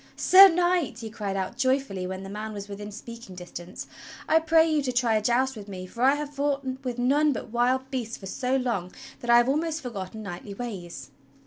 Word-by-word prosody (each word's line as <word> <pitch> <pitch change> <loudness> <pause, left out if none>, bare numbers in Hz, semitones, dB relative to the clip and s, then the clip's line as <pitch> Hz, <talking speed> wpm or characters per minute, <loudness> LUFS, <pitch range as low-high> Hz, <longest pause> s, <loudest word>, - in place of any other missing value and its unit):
"Sir 385 +2 +9
Knight," 350 -6 +1
he 225 -2 -7
cried 205 -3 -3
out 190 -1 -3
joyfully 260 -9 0
when 190 +1 -5
the - - -7
man 215 +2 -5
was 200 -1 -7
within 205 +1 -7
speaking 230 -2 -10
distance, 175 0 -8 0.4
"I 320 - +5
pray 325 0 +4
you 310 -2 +2
to 265 -2 -1
try 240 -2 +2
a 215 - +2
joust 250 +4 +1
with 210 -2 -9
me, 185 -2 -7
for 235 +6 -9
I 270 +3 +5
have 295 0 -5
fought 280 -1 -1 0.2
with 250 -2 -3
none 285 +4 +3
but 225 - -7
wild 255 +2 +1
beasts 240 -3 -3
for 195 - -11
so 250 +7 -1
long 235 -9 -1 0.3
that 240 - -7
I 235 - +8
have 240 0 +4
almost 315 +3 0
forgotten 220 -4 -6
knightly 200 +1 -7
ways." 175 - -7
240 Hz, 215 wpm, -26 LUFS, 200-275 Hz, 0.4 s, Sir